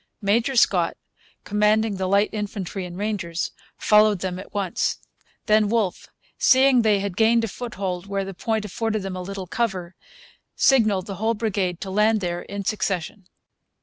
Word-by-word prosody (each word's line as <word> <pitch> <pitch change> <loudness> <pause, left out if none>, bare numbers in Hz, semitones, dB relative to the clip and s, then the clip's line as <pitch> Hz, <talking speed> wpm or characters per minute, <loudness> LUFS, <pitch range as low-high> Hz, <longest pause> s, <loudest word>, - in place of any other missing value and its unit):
Major 230 +6 +1
Scott, 235 - +3 0.5
commanding 210 0 +1
the 190 0 -1
light 200 +2 +3
infantry 200 -3 -4
and 175 0 -9
rangers, 195 -5 -3 0.3
followed 210 -1 +4
them 185 -1 -3
at 190 - -11
once. 195 -4 -1 0.5
Then 215 -1 +3
Wolfe, 215 -5 -1 0.3
seeing 260 -1 +5
they 215 -3 +3
had 200 -3 -4
gained 230 +2 +3
a - - 0
foothold 195 -5 -5
where 195 -1 -2
the 195 - -6
point 220 +3 -2
afforded 215 +1 -2
them 190 -1 -4
a 185 - -5
little 195 +1 -6
cover, 190 -4 -2 0.6
signalled 215 -8 +3
the 195 -2 -6
whole 225 +2 0
brigade 200 -5 -1
to 195 - -5
land 215 +2 +3
there 175 -2 -3
in 200 0 -6
succession. 195 -2 -2
200 Hz, 160 wpm, -23 LUFS, 190-220 Hz, 0.6 s, seeing